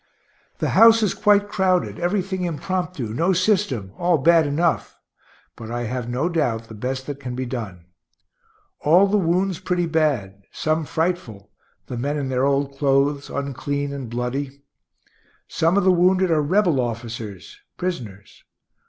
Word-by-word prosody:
The - - -1
house 230 0 +6
is 210 - +1
quite 205 -1 +3
crowded, 185 -3 0
everything 185 +1 -1
impromptu, 175 - -3
no 170 +10 +1
system, 185 - 0
all 175 -1 +3
bad 165 +1 +4
enough, 160 +4 0 0.6
but 110 - -9
I 120 +1 -3
have 120 0 -4
no 125 +7 0
doubt 145 -10 0
the - - -9
best 130 +4 -4
that 140 -1 -6
can 125 -3 -6
be 130 +1 -3
done; 105 -9 -6 0.9
all 175 +6 +5
the 205 +1 +2
wounds 180 +1 0
pretty 180 -1 -1
bad, 140 - 0
some 155 0 -1
frightful, 160 - -3 0.3
the 125 - -6
men 145 +5 -2
in 140 -2 -3
their 130 0 +1
old 140 0 0
clothes, 140 +1 +1
unclean 140 +1 -3
and 135 -4 -6
bloody. 135 +4 -4 0.8
Some 165 +4 +1
of 200 - +3
the 190 - +5
wounded 185 +1 +3
are 155 -2 +3
rebel 170 -1 +2
officers, 115 - -6 0.2
prisoners. 115 - -6
145 Hz, 150 wpm, -22 LUFS, 125-180 Hz, 0.9 s, house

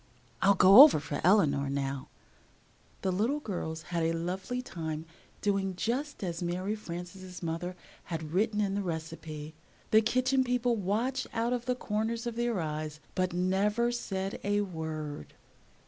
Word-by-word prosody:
"I'll 200 +1 +5
go 195 +6 +10
over 290 - +9
for 145 0 -4
Eleanor 150 -7 +4
now." 135 -1 -2 1.0
The 190 - +1
little 225 +11 +1
girls 165 - -4
had 170 - +1
a 165 0 +1
lovely 185 +8 -3
time 160 -9 -5 0.4
doing 195 -2 0
just 255 +6 -2
as 170 -2 -3
Mary 180 +4 -1
Frances' 180 -1 -8
mother 170 +2 -3 0.3
had 160 -2 -5
written 210 +2 +2
in 195 -2 0
the 200 - 0
recipe. 160 -3 -5 0.4
The 220 - +7
Kitchen 255 +4 +2
People 245 -1 +1
watched 230 +6 -1
out 230 +2 0
of 245 -1 -2
the 250 - +1
corners 225 +1 -2
of 235 -1 -3
their 235 -3 0
eyes, 155 -1 -4
but 185 -1 0
never 200 +6 +1
said 195 -5 -3
a 205 +1 +2
word. 160 - -5
190 Hz, 150 wpm, -30 LUFS, 165-225 Hz, 1.0 s, go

